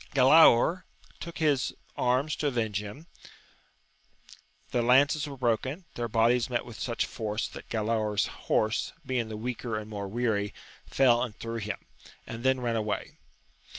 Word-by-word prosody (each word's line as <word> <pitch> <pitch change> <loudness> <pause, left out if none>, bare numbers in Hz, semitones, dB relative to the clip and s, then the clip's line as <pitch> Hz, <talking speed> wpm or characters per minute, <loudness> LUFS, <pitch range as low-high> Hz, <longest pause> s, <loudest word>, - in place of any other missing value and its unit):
Galaor 150 +4 +6 0.4
took 170 0 -7
his 150 -5 +1 0.2
arms 130 +4 +1
to 150 - 0
avenge 110 -6 -1
him; 105 +10 -9 1.7
the 120 - +1
lances 140 +5 +4
were 140 -1 -8
broken: 130 - -1
their 120 0 -3
bodies 115 +2 +2
met 120 -1 -1
with 120 -2 -10
such 120 -2 -1
force, 105 -1 -3
that - - -11
Galaor's 110 -2 0
horse, 110 +1 -1
being 125 -4 -1
the 110 - -5
weaker 120 -1 -3
and 110 0 -7
more 100 -1 -4
weary, 105 -2 -1 0.3
fell 120 -3 +4
and 115 -4 -4
threw 115 0 -5
him, 105 -2 -3 0.5
and 115 +1 -7
then 130 -1 +2
ran 120 -1 0
away. 105 -2 -3
120 Hz, 150 wpm, -28 LUFS, 110-130 Hz, 1.7 s, Galaor